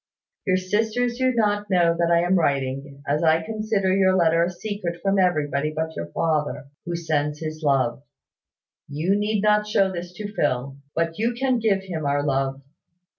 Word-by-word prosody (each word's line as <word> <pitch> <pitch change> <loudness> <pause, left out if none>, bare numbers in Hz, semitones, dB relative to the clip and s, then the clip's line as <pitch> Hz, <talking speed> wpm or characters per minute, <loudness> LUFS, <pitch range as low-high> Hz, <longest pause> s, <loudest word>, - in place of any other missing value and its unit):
"Your 185 -1 +3
sisters 225 +6 0
do 260 0 +3
not 210 -2 +1
know 170 -3 +3
that 170 0 +1
I 170 0 +4
am 175 +1 +1
writing, 140 -3 -1
as 145 +2 +1
I 160 0 +3
consider 215 -1 0
your 190 -1 +4
letter 165 -2 +3
a 170 - 0
secret 180 -1 -5
from 195 0 +1
everybody 150 -5 +1
but 160 +1 -3
your 85 - -4
father, 150 - -1 0.2
who 175 0 -3
sends 150 -3 -1
his 155 0 -6
love. 135 -4 +1 0.9
You 155 +7 0
need 210 0 0
not 210 0 +3
show 195 -2 +2
this 175 -1 -6
to 205 +3 -7
Phil; 135 -6 -1 0.2
but 165 +1 -1
you 235 +2 +1
can 255 -1 +1
give 200 -4 +1
him 165 -6 -4
our 145 0 +1
love. 135 -1 -1
170 Hz, 175 wpm, -24 LUFS, 150-205 Hz, 0.9 s, I